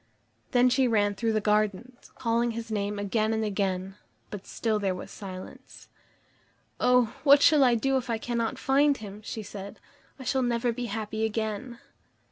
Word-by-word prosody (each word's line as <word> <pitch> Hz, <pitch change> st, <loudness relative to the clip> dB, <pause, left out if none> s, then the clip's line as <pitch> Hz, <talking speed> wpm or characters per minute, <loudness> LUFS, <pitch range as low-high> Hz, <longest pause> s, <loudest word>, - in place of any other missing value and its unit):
Then 245 Hz, 0 st, +4 dB
she 255 Hz, +1 st, +3 dB
ran 205 Hz, -3 st, +2 dB
through 225 Hz, +2 st, -1 dB
the 215 Hz, -, +2 dB
gardens, 215 Hz, +3 st, -1 dB
calling 235 Hz, 0 st, 0 dB
his 230 Hz, -1 st, -6 dB
name 205 Hz, -1 st, -2 dB
again 215 Hz, +2 st, 0 dB
and 220 Hz, 0 st, 0 dB
again, 195 Hz, -1 st, -2 dB, 0.3 s
but 205 Hz, -2 st, -8 dB
still 220 Hz, -2 st, -1 dB
there 195 Hz, -2 st, 0 dB
was 180 Hz, -, -8 dB
silence. 185 Hz, -2 st, -10 dB, 0.9 s
"Oh! 250 Hz, -3 st, +3 dB
what 285 Hz, -1 st, +7 dB
shall 300 Hz, -3 st, +6 dB
I 245 Hz, -2 st, +5 dB
do 270 Hz, +3 st, +1 dB
if 250 Hz, -2 st, -4 dB
I 230 Hz, -, 0 dB
cannot 230 Hz, 0 st, -2 dB
find 280 Hz, +1 st, +3 dB
him?" 205 Hz, -1 st, -9 dB
she 220 Hz, 0 st, -5 dB
said. 200 Hz, 0 st, -9 dB, 0.4 s
"I 265 Hz, -, -9 dB
shall 260 Hz, +1 st, 0 dB
never 240 Hz, -1 st, +1 dB
be 245 Hz, +1 st, -4 dB
happy 220 Hz, 0 st, -3 dB
again." 220 Hz, +2 st, -3 dB
220 Hz, 170 wpm, -27 LUFS, 205-245 Hz, 0.9 s, what